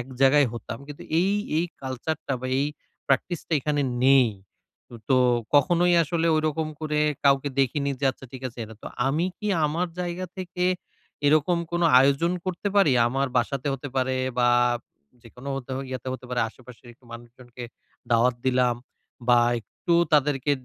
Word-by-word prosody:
এক 120 - -6
জায়গায় 135 +1 +5
হতাম। 115 -1 -7
কিন্তু 145 -1 -9 0.2
এই 190 +3 +2 0.3
এই 165 - +1 0.2
কালচারটা 135 +3 -4
বা 130 - -4
এই 140 - +1 0.4
প্র্যাকটিসটা 160 +5 -1
এখানে 145 +1 0 0.2
নেই। 135 -2 +6 0.8
তো 130 - +5 0.4
কখনোই 175 +3 +4
আসলে 165 +1 -1
ঐরকম 155 0 -1
করে 150 -1 -1 0.2
কাউকে 140 0 +3
দেখিনি 140 +2 0
যে, 140 - -1
আচ্ছা 130 - -14
ঠিক 130 0 -9
আছে 120 - -17
এটা। 110 +1 -11
তো - - -8 0.2
আমি 155 +6 +1
কি 210 - -5 0.2
আমার 165 +5 -1
জায়গা 180 +1 -3
থেকে 180 -1 -3 0.6
এরকম 155 +4 +3
কোনো 175 0 +2
আয়োজন 140 +6 +2
করতে 185 +2 -2
পারি? 180 -9 +5 0.2
আমার 135 +3 0
বাসাতে 140 0 0
হতে 140 +2 -7
পারে 130 0 +1 0.2
বা 120 0 +4 0.7
যেকোনো 125 +4 -11
হতে 135 -1 -7 0.2
ইয়াতে 130 0 -5
হতে 130 - -7
পারে 125 - 0
আশে-পাশের 120 +1 -15 0.2
মানুষজনকে 120 +1 -11 0.5
দাওয়াত 120 +2 +3
দিলাম 125 -2 +2 0.5
বাম 120 -1 +5
একটু 170 - -3 0.2
তাদেরকে 145 -1 +2
140 Hz, 150 wpm, -25 LUFS, 125-160 Hz, 0.8 s, নেই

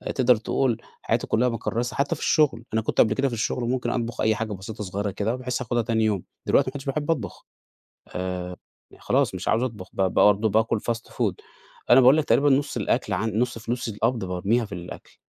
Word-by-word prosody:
تقدر 125 -1 +5
تقول 115 +2 0 0.2
حياتي - - -1
كلها 125 +3 +2
مكرسة، 115 +1 -3
حتى 140 0 0
في - - -12
الشغل، 150 -6 +2
أنا 110 - +2
كنت - - -2
قبل 110 - +3
كده، 135 +3 +1
في 125 - -4
الشغل، 115 +2 -1
وممكن 125 +1 -1
أطبخ 120 -1 -2
أي 110 0 +3
حاجة 110 -1 -3
بسيطة 105 +3 -7
صغيرة 100 +1 -3
كده، 105 +5 -1
بحيث 125 -1 -3
آخدها 120 +1 0
تاني 110 -1 0
يوم، 105 -4 0 0.2
دلوقتي - - +3
ما - - -9
بقتش 140 -1 -5
أحب 145 +3 -1
أطبخ. 125 -11 -4 0.7
آآ 90 -1 -4 0.4
خلاص - - +1
مش - - -6
عاوز 115 - +2
أطبخ، 110 -7 -5
ب - - -2
ب 95 -1 +1
برضه 105 +2 +4
باكل 110 +1 +1
fast 115 +2 -4
food 110 -7 0 0.6
أنا 120 - +8
باقول 130 +4 +7
لك، 155 - +1
تقريبًا 145 +1 +3
نص 140 +1 +1
الأكل - - 0
عن 110 - 0
نص 120 -1 0
فلوس 120 +2 -3
القبض 115 0 -1
بارميها 100 +6 0
في 105 - -15
الأكل. 90 0 -10
115 Hz, 210 wpm, -25 LUFS, 105-125 Hz, 0.7 s, أنا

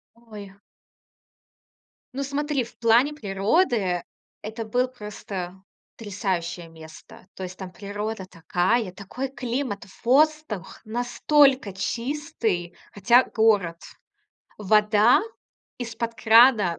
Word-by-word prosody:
Ой! 210 -4 -12 1.6
Ну, 275 +2 -3
смотри, 285 0 -1
в 235 0 -14
плане 240 +5 +3
природы 200 - 0 0.4
это 220 +1 -6
был 250 +4 +1
просто 200 -6 -7 0.4
потрясающее 185 -5 -3
место. 160 +2 -14
То 190 - -7
есть 185 0 -7
там 190 -2 -8
природа 205 +1 -5
такая, 185 +5 0
такой 210 +8 -6
климат, 245 -3 -4 0.2
воздух 290 - +1
настолько 245 0 +2
чистый, 230 - -3 0.2
хотя 235 +5 +4
город. 200 -7 +1 0.8
Вода 210 - +4 0.6
из-под 230 -1 -4
крана 225 -6 +5
220 Hz, 95 wpm, -24 LUFS, 190-250 Hz, 1.6 s, крана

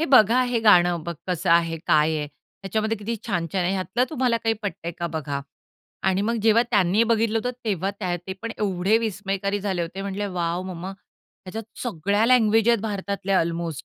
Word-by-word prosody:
हे - - +2
बघा, 255 - +5
हे 245 -1 0
गाणं 175 -5 +5
बघ 170 +1 -5
कसं 180 -1 -1
आहे, 165 -1 +3
काय 155 +1 +3
आहे. 150 -1 -2 0.4
त्याच्यामध्ये 220 +3 -1
किती 225 +3 -3
छान-छान 180 -2 -1
आहे, 180 - +1
ह्यातलं 190 +5 0
तुम्हाला 255 -5 +1
काही 225 -1 0
पटतंय 170 -4 -4
का 170 - -1
बघा 145 -3 -3 0.7
आणि 190 +1 +1
मग 230 +3 0
जेव्हा 225 +1 +5
त्यांनी 200 0 +3
बघितलं 225 -1 +2
होतं, 245 +3 -2
तेव्हा 195 -3 -1
त्या 185 -3 -3
ते 190 - -3
पण 230 - -3
एवढे 195 +1 +2
विस्मयकारी 200 -2 -2
झाले 190 -3 -1
होते 180 +4 -5
म्हंटले 200 +1 -3
वॉव! 175 -1 -2
मम्मा, 185 0 -6
ह्याच्यात 195 +1 -11 0.2
सगळ्या 205 -1 0
लँग्वेज 225 -2 +4
आहेत 235 -3 +4
भारतातल्या 200 -2 -1
अल्मोस्ट. 165 -2 -3
195 Hz, 180 wpm, -24 LUFS, 175-220 Hz, 0.7 s, बघा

